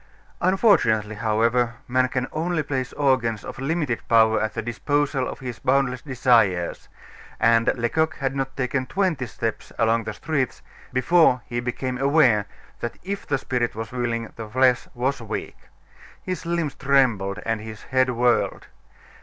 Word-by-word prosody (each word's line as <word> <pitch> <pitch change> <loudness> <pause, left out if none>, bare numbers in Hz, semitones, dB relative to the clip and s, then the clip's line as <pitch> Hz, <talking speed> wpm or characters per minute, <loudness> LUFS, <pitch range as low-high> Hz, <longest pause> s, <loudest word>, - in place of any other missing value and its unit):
Unfortunately, 170 - +3
however, 115 +3 +1
man 130 +1 +2
can 125 0 -2
only 160 0 -1
place 130 -3 -3
organs 130 -7 +1
of - - -8
limited 140 -3 -1
power 110 -1 +4
at 110 - -2
the 115 - -1
disposal 135 +3 0
of - - -8
his 125 -3 -6
boundless 130 -1 +1
desires; 115 - +1 0.5
and 115 0 +4
Lecoq 150 +6 0
had 135 0 -2
not 135 -1 -3
taken 130 0 -1
twenty 170 -8 0
steps 115 +1 -4
along 115 0 +2
the 110 - -4
streets 140 +1 -2 0.3
before 130 -1 +3
he 120 -1 -3
became 125 +1 -3
aware 130 -7 +4 0.3
that 120 - -5
if 200 +2 -5
the 140 - +1
spirit 125 -3 -2
was 110 0 -5
willing, 120 -2 -3
the 110 -2 -7
flesh 130 +1 +3
was 130 +2 -1
weak. 110 -1 -6 0.5
His 185 -2 -4
limbs 170 -4 -1
trembled, 125 -8 +2
and 115 -1 -1
his 110 -1 -9
head 130 0 +1
whirled. 120 0 +1
125 Hz, 150 wpm, -23 LUFS, 115-140 Hz, 0.5 s, power